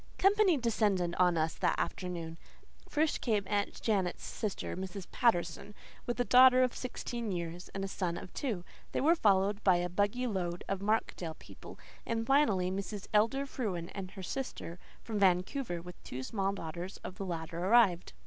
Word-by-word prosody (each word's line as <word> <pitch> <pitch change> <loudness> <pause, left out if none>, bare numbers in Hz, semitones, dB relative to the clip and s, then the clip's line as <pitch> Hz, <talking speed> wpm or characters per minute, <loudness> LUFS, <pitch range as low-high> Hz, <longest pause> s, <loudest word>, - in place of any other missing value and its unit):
Company 390 -3 +4
descended 205 -7 +1
on 180 -2 +4
us 160 0 +1
that - - 0
afternoon. 170 -3 -4 0.5
First 305 +1 +1
came 215 -4 +1
Aunt 205 +1 -1
Janet's 195 -5 0
sister, 215 -4 -4
Mrs. 190 0 -6
Patterson, 205 -2 +1 0.3
with 240 0 -2
a - - +4
daughter 255 +1 +7
of 250 - 0
sixteen 240 -3 -4
years 175 0 -4
and 195 0 -2
a - - -3
son 180 -3 -2
of - - -9
two. 220 -11 -2 0.3
They - - 0
were 315 +5 +5
followed 205 - +2
by 185 -2 +5
a 175 0 0
buggy 205 +7 0
load 180 -6 -2
of 195 -1 -2
Markdale 200 -6 -1
people; - - -12 0.3
and 225 -1 -2
finally, 220 -10 +3
Mrs. 195 +1 -4
Elder 230 +6 +3
Frewen 195 -11 -3
and 190 -2 -5
her 190 -1 -9
sister 185 -7 -5 0.2
from 220 -3 -3
Vancouver, 185 +1 +1
with 180 0 -11
two 130 +1 -6
small 195 - -1
daughters 175 0 -6
of 185 +3 -8
the - - -2
latter, 165 -1 -4
arrived. 195 -4 +4
195 Hz, 170 wpm, -32 LUFS, 175-230 Hz, 0.5 s, daughter